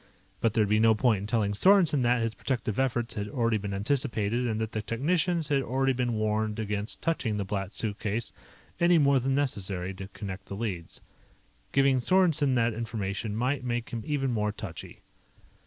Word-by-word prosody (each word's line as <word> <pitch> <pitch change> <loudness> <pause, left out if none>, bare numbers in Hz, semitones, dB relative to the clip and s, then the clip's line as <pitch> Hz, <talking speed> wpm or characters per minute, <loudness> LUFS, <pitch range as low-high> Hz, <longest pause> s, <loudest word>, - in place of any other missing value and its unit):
But 115 -2 +1
there 110 - +3
would 100 - -2
be 105 +1 +3
no 110 0 +5
point 110 -2 +2
in 100 - -5
telling 105 -3 +1
Sorensen 170 - +4
that 120 -1 +2
his 115 -1 -1
protective 120 -4 -2
efforts 120 -3 0
had 105 -2 -3
already 115 -5 +1
been 100 0 -5
anticipated 115 +1 0
and 110 -2 -1
that 110 0 -2
the 110 - -2
technicians 160 - 0
had 140 -2 +2
already 135 +2 +1
been 120 -1 -1
warned 110 0 0
against 105 0 -3
touching 115 -10 0
the 100 - -2
Black 100 0 -3
Suitcase 110 +1 -3 0.5
any 170 0 +5
more 140 -3 +4
than 135 +2 0
necessary 95 -9 -2
to 95 0 -8
connect 100 -1 -7
the 100 - -6
leads. 100 -6 -5 0.7
Giving 135 -1 +3
Sorensen 155 -2 +3
that 120 -1 +2
information 110 -2 -3
might 130 +4 0
make 120 -1 -3
him 115 - -3
even 135 -2 -1
more 105 -2 0
touchy. 100 -5 -8
115 Hz, 185 wpm, -28 LUFS, 105-135 Hz, 0.7 s, no